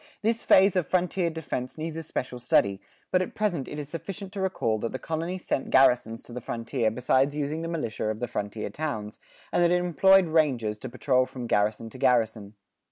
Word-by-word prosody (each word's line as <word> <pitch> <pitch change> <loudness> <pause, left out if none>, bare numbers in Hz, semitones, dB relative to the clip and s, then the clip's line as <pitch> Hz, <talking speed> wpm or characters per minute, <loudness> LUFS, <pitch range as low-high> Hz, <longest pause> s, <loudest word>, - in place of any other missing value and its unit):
This 225 +1 +1
phase 190 0 +5
of 180 -6 +1
frontier 180 -1 +1
defense 155 -6 -5
needs 160 0 -4
a 165 - -3
special 130 -5 -4
study, 100 -5 +2 0.3
but 185 - +3
at 185 - -4
present 185 - -1
it 150 - -7
is 145 -2 -5
sufficient 195 +5 -7
to 200 - -4
recall 115 - 0
that 115 - -3
the - - -2
colony 165 +5 -3
sent 160 -6 -2
garrisons 125 -4 +3
to 120 - -11
the 125 - -5
frontier 115 0 -1
besides 130 +5 +1
using 150 +2 -2
the 165 - -3
militia 155 -12 -3
of 110 0 -3
the 120 - -2
frontier 105 -2 -4
towns; 110 -7 -4 0.3
and - - +2
that 170 - +5
it 180 - +3
employed 185 +2 +5
rangers 130 -10 +1
to 130 - -6
patrol 130 +1 +1
from 125 -2 -7
garrison 110 +1 0
to 130 - -11
garrison. 110 -5 +1
135 Hz, 205 wpm, -27 LUFS, 115-170 Hz, 0.3 s, phase